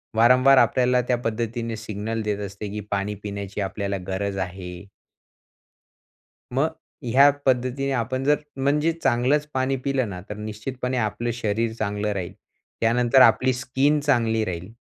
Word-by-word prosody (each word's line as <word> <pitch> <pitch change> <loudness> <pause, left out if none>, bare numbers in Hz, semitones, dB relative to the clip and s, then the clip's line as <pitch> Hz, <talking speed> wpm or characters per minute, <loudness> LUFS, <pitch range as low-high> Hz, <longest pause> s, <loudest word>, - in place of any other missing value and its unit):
वारंवार 125 +4 +6
आपल्याला 125 +1 +3
त्या 125 - +2
पद्धतीने 115 +1 -2
सिग्नल 110 +2 -4
देत 105 -1 -2
असते, 100 +2 -7
की 105 - -4
पाणी 100 +1 -1
पिण्याची 100 0 -5
आपल्याला 100 0 -2
गरज 95 +1 -2
आहे. 90 0 -6 1.7
मग - - +2 0.3
ह्या 135 +4 +6 0.2
पद्धतीने 130 +2 +1
आपण 130 +2 -1
जर 145 +2 +4 0.2
म्हणजे 145 +4 +2
चांगलंच 145 -1 +1
पाणी 130 +1 0
पिलं 135 -3 0
ना, 90 -1 -7
तर 105 - -4
निश्चितपणे 125 +4 -4
आपलं 120 +1 -1
शरीर 110 0 -1
चांगलं 105 0 -1
राहील. 90 -3 -5 0.5
त्यानंतर 120 +3 +4
आपली 130 0 +5
स्किन 140 +3 +1
चांगली 115 -6 +1
राहील, 90 +2 -5
115 Hz, 135 wpm, -24 LUFS, 105-130 Hz, 1.7 s, वारंवार